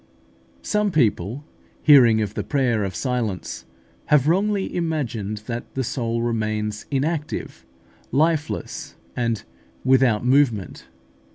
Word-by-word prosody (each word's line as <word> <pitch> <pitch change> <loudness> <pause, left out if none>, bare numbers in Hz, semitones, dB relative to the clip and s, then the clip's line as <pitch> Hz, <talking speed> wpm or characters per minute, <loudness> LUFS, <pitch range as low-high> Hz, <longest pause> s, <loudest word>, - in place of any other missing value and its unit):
Some 210 0 +1
people, 120 - 0 0.4
hearing 120 -7 +7
of 105 -1 -4
the - - -3
prayer 125 -7 +1
of 95 -1 -3
silence, 120 -8 -3 0.4
have 150 -2 +3
wrongly 195 +3 +1
imagined 120 - -2
that 120 +1 -6
the 135 - 0
soul 115 -2 -2
remains 110 -2 -2
inactive, 150 - -3 0.4
lifeless, 155 +3 -1 0.2
and 115 -4 -1 0.4
without 125 -4 +3
movement. 125 -7 +1
125 Hz, 105 wpm, -23 LUFS, 110-150 Hz, 0.4 s, hearing